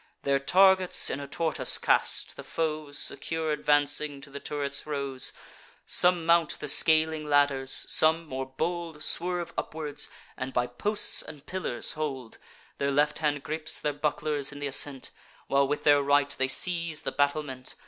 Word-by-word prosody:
Their 140 0 +1
targets 185 +5 +3
in 135 - -4
a 140 - -7
tortoise 160 +3 0
cast, - - 0
the - - -9
foes, 155 -3 -4
Secure 160 -1 -1
advancing, 145 -1 0
to 140 - -12
the 140 - -7
turrets 140 0 -4
rose: 140 -3 -3 0.5
Some 180 -2 +3
mount 170 -2 +2
the - - -6
scaling 160 -1 +3
ladders; 140 -2 +4
some, 160 +1 +4
more 130 -3 -5
bold, 160 +3 -4
Swerve 175 0 -1
upwards, 150 -2 -4 0.3
and 130 0 -6
by 125 - +1
posts 205 - 0
and 150 -2 -12
pillars 185 -10 -2
hold; 135 -6 -6 0.4
Their 140 - 0
left 145 +2 +1
hand 145 -2 -1
gripes 155 0 -2
their 150 - -2
bucklers 145 -1 -2
in 145 - -10
th' - - -7
ascent, 135 0 +2 0.3
While 140 0 +2
with 145 +1 -3
their 145 -1 +5
right 145 0 +1
they 130 - +2
seize 165 +1 0
the - - -3
battlement. 145 -2 -2
150 Hz, 160 wpm, -27 LUFS, 140-160 Hz, 0.5 s, their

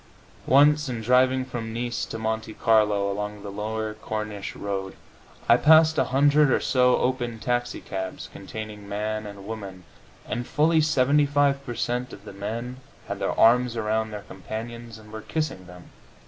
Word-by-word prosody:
Once, 145 +1 +5
in 120 -2 -3
driving 130 +2 +3
from 120 -3 -5
Nice 120 +1 -3
to - - -6
Monte 110 0 -3
Carlo 105 -3 +2
along 105 0 -5
the 100 - -6
lower 110 +1 -3
Corniche 105 -2 -5
road, 95 -1 -4 0.5
I 115 - +7
passed 160 +2 +6
a - - +3
hundred 145 +2 +4
or - - +3
so 125 -1 +3
open 120 -2 -1
taxicabs 110 -5 -3
containing 105 0 -8
man 105 +1 -3
and 100 -1 -10
woman, 100 -4 -7 0.4
and 120 0 -3
fully 160 +2 +3
75 145 -1 +2
per 120 -3 -6
cent. 125 +2 -2
of 100 - -12
the 105 - -9
men 115 +5 -5 0.3
had - - -4
their - - -2
arms 120 +1 +4
around 110 0 0
their 105 -1 -7
companions, 115 +4 -8
and 105 -1 -15
were 110 - -6
kissing 135 - -3
them. 90 -1 -14
115 Hz, 160 wpm, -25 LUFS, 105-130 Hz, 0.5 s, I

